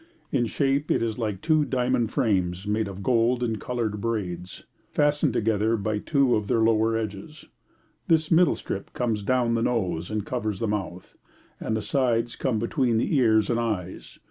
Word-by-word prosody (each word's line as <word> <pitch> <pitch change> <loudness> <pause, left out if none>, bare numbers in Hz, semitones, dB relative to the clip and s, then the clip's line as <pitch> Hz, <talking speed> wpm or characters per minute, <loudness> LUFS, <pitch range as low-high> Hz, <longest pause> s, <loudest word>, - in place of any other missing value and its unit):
In 120 -4 +1
shape 140 +3 0
it - - +2
is 115 0 -2
like 105 -4 -2
two 155 -2 +3
diamond 125 -4 0
frames 95 -3 0
made 105 +1 0
of 100 0 -7
gold 120 +1 +2
and 110 -3 -2
coloured 115 -4 -2
braids, 90 -6 -4 0.3
fastened 145 -1 +2
together 110 +1 +1
by 105 0 -2
two 140 0 +2
of 105 -1 -2
their 115 - +2
lower 110 0 +3
edges. 110 +7 -6 0.6
This 160 0 +2
middle 170 +2 +5
strip 95 - -6
comes 115 -4 -1
down 120 +2 +1
the 115 - +1
nose 90 -9 -1
and 105 -1 -2
covers 110 -5 -2
the 115 - -1
mouth, 95 -3 -4 0.5
and 110 - -2
the 110 - -4
sides 120 -4 0
come 125 -4 -1
between 115 +1 +1
the 120 - 0
ears 110 -4 +3
and 120 - +1
eyes. 100 -6 -4
115 Hz, 175 wpm, -25 LUFS, 105-125 Hz, 0.6 s, middle